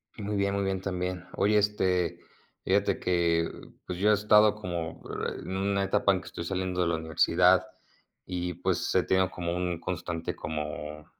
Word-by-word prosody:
Muy 105 -1 -3
bien, 100 0 +1
muy 100 - 0
bien 95 -1 -1
también. 90 -1 -3
Oye, 105 +2 +3
este, 90 -4 +1 0.4
fíjate 100 +1 +2
que, 85 -2 +1 0.4
pues, 90 - -5
yo 105 +2 +3
he - - +6
estado 105 0 +5
como 85 -6 -5 0.4
en 95 - -5
una 100 0 +1
etapa 100 +1 +3
en 95 -2 0
que - - -13
estoy - - -6
saliendo 90 0 -2
de 90 - +2
la 85 - +1
universidad, 80 -1 +3 0.6
y 90 -1 -3
pues 85 - -1
he - - +4
tenido 95 0 +2
como 85 -1 -3
un 90 -2 -2
constante, 85 -1 -4
como 75 0 -5
90 Hz, 170 wpm, -28 LUFS, 85-100 Hz, 0.6 s, he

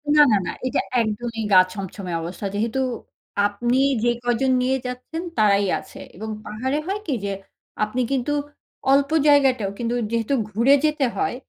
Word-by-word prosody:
না, 300 - +8
না, 210 - +5
না। - - -2 0.2
এটা - - 0 0.2
একদমই 225 +1 -3
গা 185 - +8
ছমছমে 195 -1 -6
অবস্থা, 175 +4 -6
যেহেতু 225 +5 -1 0.7
আপনি 240 +5 -1 0.3
যে 240 - +4
কয়জন 245 +2 +1
নিয়ে 260 +1 +1
যাচ্ছেন 250 +6 -5 0.2
তারাই 205 -2 +4
আছে - - -13 0.2
এবং 220 +5 -6 0.2
পাহাড়ে 255 +7 -2
হয় 395 +2 -1
কি 300 - -1
যে, 200 - -1 0.5
আপনি 215 +4 -1
কিন্তু 270 +1 0 0.6
অল্প 275 0 +4 0.2
জায়গাটাও 265 -8 +4
কিন্তু 235 0 -1 0.2
যেহেতু 230 +3 0 0.2
ঘুরে 235 +7 +4
যেতে 300 -2 +1
হয় 395 -9 0
240 Hz, 155 wpm, -23 LUFS, 210-270 Hz, 0.7 s, না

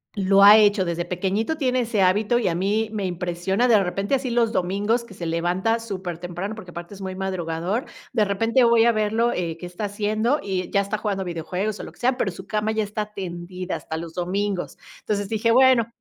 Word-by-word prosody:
Lo 195 0 +3
ha 205 +2 +10
hecho, 205 -2 +4
desde 170 0 -2
pequeñito, 195 - -1
tiene 255 -3 +1
ese 225 -4 0
hábito 210 +6 +3
y - - 0
a 170 - 0
mí, 210 +4 0
me 210 -3 -3
impresiona 180 +5 -1
de 215 -4 +5
repente, 195 +8 -1
así 255 -2 -2
los 235 -1 +2
domingos 205 +5 0
que 235 - -13
se 170 -3 -5
levanta 180 +7 0
supertemprano, 185 -1 -5
porque 185 -5 -10
aparte 170 +3 -8
es 195 - -12
muy 190 -1 -5
madrugador. 185 +3 -2 0.3
De 220 -4 +3
repente 225 +5 +2
voy 230 -1 +5
a 235 - +5
verlo, 220 +2 +1
eh, 170 -2 -3
qué 180 - -7
está 180 +4 -5
haciendo 215 +7 0
y 185 -2 -3
ya 200 - +3
está 200 +2 -3
jugando 200 -2 -2
videojuegos 180 +5 -3
o - - -6
lo - - -8
que - - -24
sea, 250 +1 +1
pero 195 -7 0
su 190 +2 -11
cama 215 0 -1
ya 220 -1 0
está 210 +1 -5
tendida 180 -1 -5
hasta 160 - -5
los 165 0 -7
domingos. 190 +1 -2 0.2
Entonces 205 -2 -2
dije: 225 +1 +1
"Bueno, 255 -2 +5
200 Hz, 215 wpm, -23 LUFS, 180-220 Hz, 0.3 s, ha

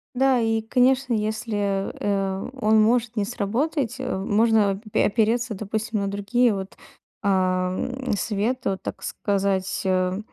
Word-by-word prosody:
Да. 265 0 +3
И 225 -1 +1
конечно, 250 +2 +2
если, 210 -2 -1
э, 195 -1 -1
он 215 0 +4
может 235 +1 +2
не 205 - +1
сработать, 245 +4 -1
э, 260 - -2
можно 205 0 +2
пе - - +3
опереться, 230 +2 +1
допустим, 215 +2 -3
на 200 - -1
другие 210 +4 +1
вот, 190 0 -6 0.5
ам, 185 +6 0
советы. 220 +3 -1
Вот, 190 -1 -4
так - - -6
сказать, 195 -2 -1
э, 185 0 +1
215 Hz, 135 wpm, -24 LUFS, 195-235 Hz, 0.5 s, он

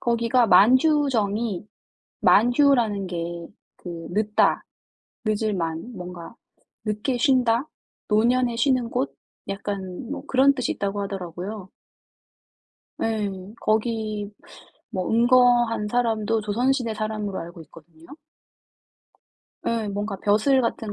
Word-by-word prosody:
거기가 235 +1 +2
만휴정이 225 - +3 0.5
만휴라는 240 -4 +3
게 170 -1 -5 0.3
그 170 -2 -8
늦다 210 +2 +2 0.6
늦을 215 0 0
만 165 +5 -3
뭔가 180 0 -9 0.5
늦게 215 +4 -1
쉰다. 250 +1 +2 0.4
노년에 235 +3 +2
쉬는 250 -1 +1
곳. 255 +3 -2 0.3
약간 195 +2 -5
뭐 280 -1 -5
그런 270 +1 +4
뜻이 255 -2 -1
있다고 200 0 -3
하더라고요. 190 +1 -6 1.3
예. 220 -2 0 0.3
거기 215 -2 -1 0.6
뭐 185 -2 -3
은거한 240 -2 +4
사람도 225 -2 0
조선시대 235 +2 0
사람으로 215 -2 -3
알고 170 +1 -9
있거든요. 160 +1 -18 1.6
예. 225 -2 -1
뭔가 205 0 -3
벼슬 215 +7 +3
같은 225 -3 -2
215 Hz, 220 characters per minute, -24 LUFS, 195-245 Hz, 1.6 s, 그런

